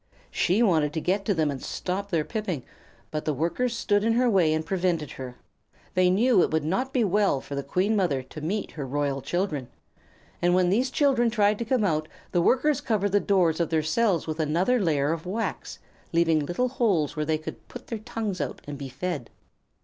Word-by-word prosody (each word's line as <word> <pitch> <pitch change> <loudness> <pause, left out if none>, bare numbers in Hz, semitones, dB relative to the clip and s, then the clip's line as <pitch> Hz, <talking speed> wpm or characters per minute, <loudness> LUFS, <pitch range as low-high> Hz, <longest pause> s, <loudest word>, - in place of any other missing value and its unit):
She 200 +7 +2
wanted 155 -8 +2
to 160 - -1
get 190 +5 0
to 205 - +2
them 155 -3 +1
and 135 - -6
stop 195 +2 -3
their 165 -5 0
piping, 195 - -3 0.5
but 155 -1 -3
the 155 - 0
Workers 230 - -1
stood 205 -3 +1
in 225 +1 +2
her 250 +2 +3
way 185 -8 +3
and 155 0 0
prevented 175 -5 -1
her. 125 -2 -7 0.6
They 185 0 +4
knew 225 +3 +4
it - - +2
would 160 -1 0
not 220 - -1
be 255 -4 +2
well 200 -6 +2
for 140 - -9
the 140 - -1
Queen 185 +10 0
Mother 160 -10 +1
to 140 +4 -10
meet 195 +7 -2
her 145 -4 -5
royal 140 0 -1
children, 160 -6 -2 0.7
and 175 +1 +3
when 180 -1 +3
these 250 +6 +2
children 260 -4 +2
tried 210 -2 +2
to 235 - -2
come 245 -1 +1
out 155 -5 0 0.2
the 175 - +2
Workers 265 - +2
covered 205 -5 0
the 205 - +4
doors 180 -6 +2
of 170 - +1
their 160 -1 +1
cells 185 +2 +1
with 155 0 -4
another 170 +11 +2
layer 150 -6 +1
of 165 +1 -4
wax, 220 +5 -3 0.4
leaving 165 -3 +2
little 250 +8 0
holes 205 - +1
where 155 - -1
they 160 -1 +2
could 155 - -9
put 245 - -9
out - - -32
their 230 - -3
tongues 215 -3 -4
and 145 -1 -5
be 140 -1 -6
fed. 145 -2 -4
180 Hz, 210 wpm, -26 LUFS, 155-215 Hz, 0.7 s, They